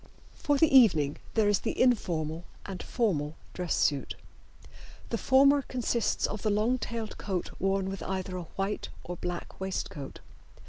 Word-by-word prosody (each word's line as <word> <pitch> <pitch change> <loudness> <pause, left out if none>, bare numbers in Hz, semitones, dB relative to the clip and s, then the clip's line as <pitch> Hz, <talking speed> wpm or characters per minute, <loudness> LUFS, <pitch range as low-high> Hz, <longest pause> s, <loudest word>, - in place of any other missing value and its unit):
For 290 -1 +1
the 295 -1 +4
evening 160 - +6 0.2
there 220 -2 +4
is 205 -2 +3
the - - -3
informal 170 -9 +1 0.2
and 190 -2 -6
formal 160 - -1 0.2
dress 180 -2 -1
suit. 140 -2 +1 1.0
The 230 - +1
former 275 +2 +5
consists 245 -3 0
of 210 - -3
the 215 - +1
long 215 +5 +2
tailed 230 -3 -5
coat 190 -4 -3
worn 195 0 +1
with 195 0 -5
either 185 -1 -3
a 180 - -4
white 195 +2 -2
or 180 - -5
black 175 0 -5
waistcoat. 185 -7 -4
195 Hz, 150 wpm, -29 LUFS, 175-235 Hz, 1.0 s, evening